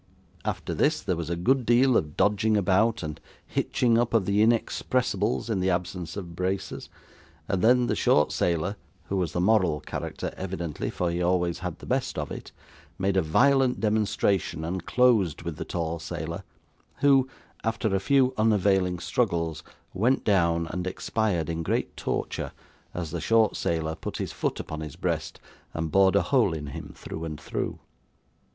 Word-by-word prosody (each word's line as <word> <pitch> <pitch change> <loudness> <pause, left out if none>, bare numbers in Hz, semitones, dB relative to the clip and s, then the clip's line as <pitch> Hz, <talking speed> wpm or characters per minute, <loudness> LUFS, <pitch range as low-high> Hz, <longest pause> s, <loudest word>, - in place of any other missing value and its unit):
After - - -3
this, - - +1
there 90 - 0
was 85 0 -4
a 85 - 0
good 125 +10 +2
deal 120 +2 +4
of 75 -6 0
dodging 105 +1 +3
about, 105 +4 +2
and 75 -1 -6 0.2
hitching 115 -2 +1
up 120 -1 +1
of 105 -4 +3
the 100 +2 +2
inexpressibles 115 -1 +1
in 110 -4 0
the 95 +1 +1
absence 90 0 -2
of 85 -4 -7
braces, 95 +2 -3 0.6
and 95 - 0
then 125 +3 +5
the - - 0
short 75 - +3
sailor 90 +4 0 0.3
(who 100 - 0
was 85 -4 -1
the - - -1
moral 95 -5 +3
character - - -5
evidently, 85 -5 -4
for 90 -1 -1
he 85 +1 -2
always 90 -1 +1
had 90 -3 -4
the - - -12
best - - -1
of - - -3
it) - - -7 0.5
made 95 0 0
a 95 - +4
violent 130 - +3
demonstration 100 -6 0
and 90 +1 -4
closed 110 -11 +3
with 85 -2 -5
the - - -5
tall 85 -1 -3
sailor, 70 - -5 0.6
who, 135 -2 +5 0.3
after 110 -2 0
a 95 - +2
few 130 +4 +3
unavailing 95 -4 +3
struggles, 85 -5 -1 0.3
went 120 +8 +2
down, 85 -4 +2
and 90 +1 -3
expired 95 -3 -1
in 85 0 -2
great 80 - -1
torture - - -3 0.4
as 85 -3 -4
the 85 -1 -3
short 115 -1 +3
sailor 80 -1 -1
put - - -6
his - - -3
foot - - -2
upon 80 - -5
his 75 -3 -7
breast, - - -3 0.4
and 80 -1 -2
bored 95 +1 +5
a 100 - +4
hole 120 -10 +3
in 75 -2 -5
him - - -7
through 80 - -7
and 80 -2 -5
through. - - -3
95 Hz, 170 wpm, -27 LUFS, 85-110 Hz, 0.6 s, then